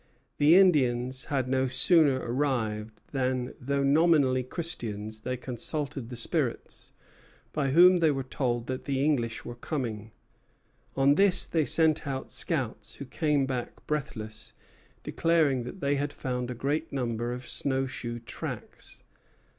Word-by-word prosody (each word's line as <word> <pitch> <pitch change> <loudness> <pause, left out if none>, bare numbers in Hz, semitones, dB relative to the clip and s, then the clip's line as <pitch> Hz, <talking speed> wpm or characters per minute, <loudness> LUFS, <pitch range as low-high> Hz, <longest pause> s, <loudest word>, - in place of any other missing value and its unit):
The 150 +4 +6
Indians 130 -8 +3
had 135 -4 -1
no 130 0 +1
sooner 145 +2 +4
arrived 115 -5 -2
than, 130 -2 -1
though 140 +2 0
nominally 140 -3 +4
Christians, 110 -8 -3
they 125 +2 -3
consulted 135 +1 -4
the 125 - -6
spirits, 115 - -3 0.6
by 140 -2 0
whom 180 +5 +7
they 165 -2 +4
were 135 -2 -1
told 120 -2 -2
that 130 0 -5
the 135 0 0
English 120 -7 0
were 120 - -6
coming. 120 -5 -4 0.9
On 135 +1 +5
this 195 +3 +5
they 160 -3 0
sent 160 -2 +2
out 135 -1 -4
scouts, 115 -9 -2
who 140 - -8
came 145 0 +1
back 130 -2 -5
breathless, 110 -8 -5 0.5
declaring 155 -7 +1
that 185 +9 -8
they 140 0 +1
had 145 +1 -2
found 125 -3 -4
a 125 - -4
great 150 +6 -2
number 120 -3 -2
of 125 +1 -6
snow 135 -1 -1
shoe 120 -2 -5
tracks. 115 - -7
130 Hz, 140 wpm, -28 LUFS, 120-150 Hz, 0.9 s, whom